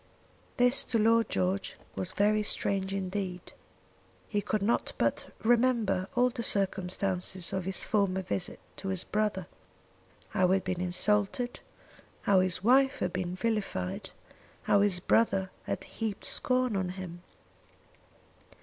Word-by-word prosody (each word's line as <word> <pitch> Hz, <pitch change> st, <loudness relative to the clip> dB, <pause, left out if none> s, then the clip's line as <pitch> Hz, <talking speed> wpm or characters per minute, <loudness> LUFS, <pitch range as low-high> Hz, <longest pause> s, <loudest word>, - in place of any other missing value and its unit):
This 245 Hz, +1 st, +4 dB
to 235 Hz, -, 0 dB
Lord 225 Hz, 0 st, +3 dB
George 185 Hz, +2 st, -1 dB, 0.2 s
was 185 Hz, 0 st, -2 dB
very 210 Hz, +1 st, +3 dB
strange 195 Hz, -2 st, 0 dB
indeed. 190 Hz, -2 st, -4 dB, 0.7 s
He 205 Hz, -, -1 dB
could 205 Hz, 0 st, -1 dB
not 230 Hz, +4 st, 0 dB
but -, -, -1 dB
remember 230 Hz, -5 st, +2 dB
all 250 Hz, 0 st, +3 dB
the 240 Hz, -1 st, -5 dB
circumstances 190 Hz, -3 st, -1 dB
of 190 Hz, -2 st, -2 dB
his 190 Hz, 0 st, 0 dB
former 195 Hz, -3 st, +1 dB
visit 185 Hz, 0 st, -3 dB, 0.2 s
to 195 Hz, -, -6 dB
his 190 Hz, -2 st, 0 dB
brother, 210 Hz, -4 st, -1 dB, 0.8 s
how 185 Hz, -3 st, +2 dB
he 185 Hz, -, +3 dB
had 195 Hz, -, -1 dB
been 185 Hz, -1 st, -2 dB
insulted, 210 Hz, +6 st, +1 dB, 0.6 s
how 195 Hz, -2 st, +4 dB
his 185 Hz, 0 st, +3 dB
wife 265 Hz, +4 st, +4 dB
had 180 Hz, -, -2 dB
been 180 Hz, -1 st, -2 dB
vilified, 195 Hz, -, -2 dB, 0.5 s
how 200 Hz, -, +4 dB
his 200 Hz, -3 st, +2 dB
brother 190 Hz, -1 st, +2 dB
had -, -, -3 dB
heaped 220 Hz, -3 st, -5 dB
scorn 255 Hz, -3 st, +1 dB
on 190 Hz, -2 st, -1 dB
him. 175 Hz, -2 st, -7 dB
195 Hz, 135 wpm, -30 LUFS, 185-220 Hz, 0.8 s, This